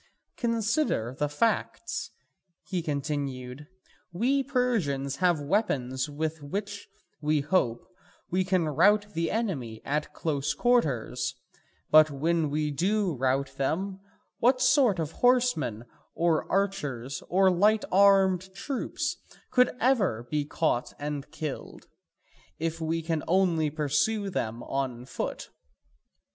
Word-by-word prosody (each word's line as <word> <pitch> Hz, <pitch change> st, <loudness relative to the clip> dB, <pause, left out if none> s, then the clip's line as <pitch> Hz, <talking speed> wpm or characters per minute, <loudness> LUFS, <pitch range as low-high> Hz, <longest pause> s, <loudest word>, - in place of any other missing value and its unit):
Consider 230 Hz, -, 0 dB
the 145 Hz, +2 st, -1 dB
facts," 220 Hz, +10 st, -1 dB, 0.5 s
he 180 Hz, -2 st, -3 dB
continued, 140 Hz, -3 st, -4 dB, 0.4 s
"we 250 Hz, +10 st, +1 dB
Persians 225 Hz, -, 0 dB
have 175 Hz, -3 st, +2 dB
weapons 140 Hz, -, 0 dB
with 155 Hz, +1 st, -3 dB
which, 200 Hz, +7 st, -5 dB, 0.3 s
we 150 Hz, 0 st, +2 dB
hope, 140 Hz, -7 st, 0 dB, 0.4 s
we 185 Hz, +1 st, +2 dB
can 185 Hz, -3 st, +1 dB
rout 205 Hz, +7 st, +3 dB
the 165 Hz, 0 st, -1 dB
enemy 145 Hz, -, -2 dB
at 150 Hz, +2 st, -1 dB
close 145 Hz, -3 st, -2 dB
quarters: 140 Hz, -, +1 dB, 0.6 s
but 155 Hz, 0 st, +8 dB
when 155 Hz, +2 st, 0 dB
we 150 Hz, +1 st, -1 dB
do 190 Hz, +5 st, +1 dB
rout 135 Hz, +1 st, -1 dB
them, 190 Hz, +8 st, -1 dB, 0.4 s
what 255 Hz, +2 st, +4 dB
sort 255 Hz, -5 st, +4 dB
of 160 Hz, -2 st, -2 dB
horsemen 240 Hz, -, +2 dB, 0.3 s
or 165 Hz, -2 st, +1 dB
archers 145 Hz, -10 st, -1 dB
or 190 Hz, +1 st, +4 dB
light 210 Hz, +4 st, +3 dB
armed 190 Hz, -1 st, +4 dB
troops 275 Hz, +3 st, -3 dB, 0.3 s
could 250 Hz, -1 st, +5 dB
ever 210 Hz, -, +2 dB
be 150 Hz, -1 st, 0 dB
caught 145 Hz, -5 st, -1 dB
and 145 Hz, -1 st, -4 dB
killed, 155 Hz, -3 st, -6 dB, 0.7 s
if 165 Hz, +1 st, -3 dB
we 165 Hz, +1 st, -1 dB
can 160 Hz, -1 st, -1 dB
only 170 Hz, -4 st, +2 dB
pursue 155 Hz, +8 st, 0 dB
them 115 Hz, -7 st, -3 dB
on 130 Hz, -3 st, -3 dB
foot? -, -, -5 dB
160 Hz, 115 wpm, -28 LUFS, 140-200 Hz, 0.7 s, but